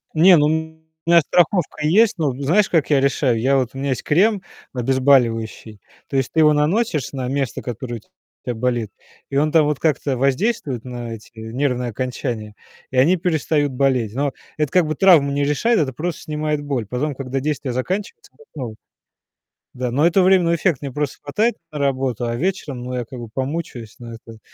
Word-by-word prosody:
Не, 175 +2 +7
ну 150 - +4
у - - +1 0.6
меня 170 -1 +7
страховка 170 -2 +1
есть. 210 +6 +4
Ну 150 -5 +1
знаешь, 185 +9 +3
как 160 -4 +1
я 145 -2 +4
решаю? 135 -3 +1
Я 135 +3 +2
вот 130 -2 0
у - - -6
меня 140 +1 -2
есть 130 - -2
крем 195 +6 +3 0.3
обезболивающий. 120 -4 +1 0.3
То 135 - -2
есть 130 - 0
ты 160 - +1
его 150 -1 +6
наносишь 155 - 0
на 130 -2 -3
место, 135 -2 -2
которое 120 0 -5
у - - -10 0.5
тебя 120 - -2
болит. 120 -3 -1 0.4
И 140 - -1
он 150 +1 +2
там 160 -3 +5
вот 150 -2 -1
как-то 145 -4 0
воздействует 140 - 0
на 120 -2 -6
эти 110 - -12
нервные 125 +2 -2
окончания, 120 -3 -4 0.3
и 130 - -5
они 165 +9 +5
перестают 155 -4 0
болеть. 125 -5 +1
Но 140 0 -1 0.2
это 150 -3 0
как 180 -4 +3
бы 155 - -2
травму 160 -7 +5
не 140 0 0
решает, 210 +12 +2
это 135 -4 0
просто 170 +5 -4
снимает 150 -1 -2
боль. 130 -7 -2
Потом, 140 +6 -2
когда 135 0 -4
действие 140 -2 -2
заканчивается, 195 - -4
опять 455 - -20
снова. 120 -6 -6 1.0
Да, 125 -1 -3
но 145 +6 +2
это 185 +2 +3
временный 180 -3 +4
эффект. 165 -4 0
Мне 140 -2 -5
просто 145 0 -3
хватает 215 +12 0 0.2
на 150 - -6
работу, 130 -4 -1
а 115 0 -2
вечером, 150 -6 -3
ну 125 +1 -5
я 125 - -3
как 125 +2 -9
бы 115 -2 -8
помучаюсь, 130 -5 -4
но 115 -1 -9
это 115 -1 -12
140 Hz, 195 wpm, -20 LUFS, 125-155 Hz, 1.0 s, Не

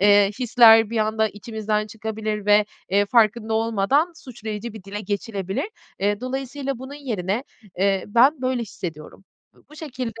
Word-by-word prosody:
eee, 205 0 +5
hisler 225 -3 +6
bir 230 - -1
anda 220 0 +1
içimizden 215 0 -3
çıkabilir 215 -1 -4
ve, 210 0 +5 0.3
eee, 200 +1 +3
farkında 220 0 +2
olmadan 230 - +1
suçlayıcı 225 -4 -7
bir 215 -4 -11
dile 205 +1 -6
geçilebilir. 200 - -3 0.3
Eee, 205 +1 0
dolayısıyla 270 +1 -4
bunun 265 +3 -8
yerine, 225 -5 -3 0.3
eee, 195 0 +2
ben 255 +7 +4
böyle 255 -2 0
hissediyorum. 175 -3 -8 0.3
B - - -25
bu 305 - -14
şekilde 255 -7 -6
220 Hz, 145 wpm, -23 LUFS, 205-250 Hz, 0.3 s, hisler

